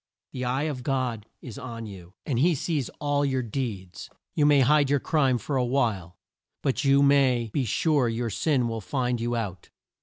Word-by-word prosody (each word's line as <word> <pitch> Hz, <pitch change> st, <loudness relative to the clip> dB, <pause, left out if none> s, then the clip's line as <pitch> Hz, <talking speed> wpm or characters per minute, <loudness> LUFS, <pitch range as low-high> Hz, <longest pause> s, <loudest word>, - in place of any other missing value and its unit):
The 125 Hz, -1 st, -4 dB
eye 130 Hz, +3 st, 0 dB
of 145 Hz, -5 st, -3 dB
God 125 Hz, -5 st, -2 dB, 0.2 s
is 130 Hz, +2 st, -8 dB
on 115 Hz, -4 st, -7 dB
you, 95 Hz, -2 st, -11 dB
and 130 Hz, -6 st, -1 dB
he 170 Hz, +4 st, +4 dB
sees 145 Hz, -2 st, -2 dB
all 145 Hz, 0 st, +1 dB
your 130 Hz, -2 st, 0 dB
deeds. 105 Hz, -7 st, -5 dB, 0.2 s
You 145 Hz, -1 st, +3 dB
may 145 Hz, -2 st, +5 dB
hide 145 Hz, +2 st, +4 dB
your 145 Hz, 0 st, +3 dB
crime 135 Hz, -4 st, +2 dB
for 135 Hz, +3 st, -3 dB
a 125 Hz, -, +2 dB
while, 110 Hz, -9 st, -1 dB, 0.5 s
but 135 Hz, +2 st, 0 dB
you 140 Hz, 0 st, +4 dB
may 130 Hz, -5 st, +3 dB
"be 135 Hz, -, 0 dB
sure 140 Hz, +2 st, +2 dB
your 115 Hz, 0 st, -2 dB
sin 130 Hz, +1 st, +1 dB
will 115 Hz, -1 st, -4 dB
find 125 Hz, 0 st, -1 dB
you 120 Hz, +1 st, -1 dB
out." 100 Hz, -6 st, -5 dB
130 Hz, 190 wpm, -26 LUFS, 115-140 Hz, 0.5 s, may